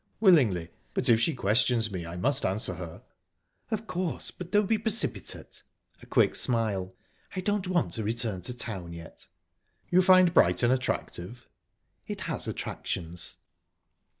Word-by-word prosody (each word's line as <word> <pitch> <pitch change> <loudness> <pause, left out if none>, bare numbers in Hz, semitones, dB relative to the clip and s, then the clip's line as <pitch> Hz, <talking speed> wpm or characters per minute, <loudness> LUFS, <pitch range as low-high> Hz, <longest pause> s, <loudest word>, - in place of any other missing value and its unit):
"Willingly; 120 - +4 0.2
but 125 - +1
if 115 -1 +6
she 145 +6 +1
questions 115 +1 +2
me, 90 -3 -5
I 85 - -7
must 135 +9 0
answer 95 +4 -1
her." 85 -1 -8 0.7
"Of 220 -1 -2
course, 180 -4 -1
but 180 -1 -9
don't 210 0 +3
be 220 +2 +1
precipitate." 220 +1 -2 0.4
A - - -13
quick - - +3
smile. 105 -7 +1 0.4
"I 185 - -1
don't 205 0 -1
want 180 -3 0
to 110 - -3
return 110 -3 -1
to 125 +7 -1
town 95 -8 -5
yet." 85 -1 -11 0.6
"You 180 +1 +6
find 185 -1 +6
Brighton 90 - +4
attractive?" 120 -4 -3 0.6
"It - - -5
has - - -3
attractions." 85 -1 -3
120 Hz, 145 wpm, -28 LUFS, -, 0.7 s, if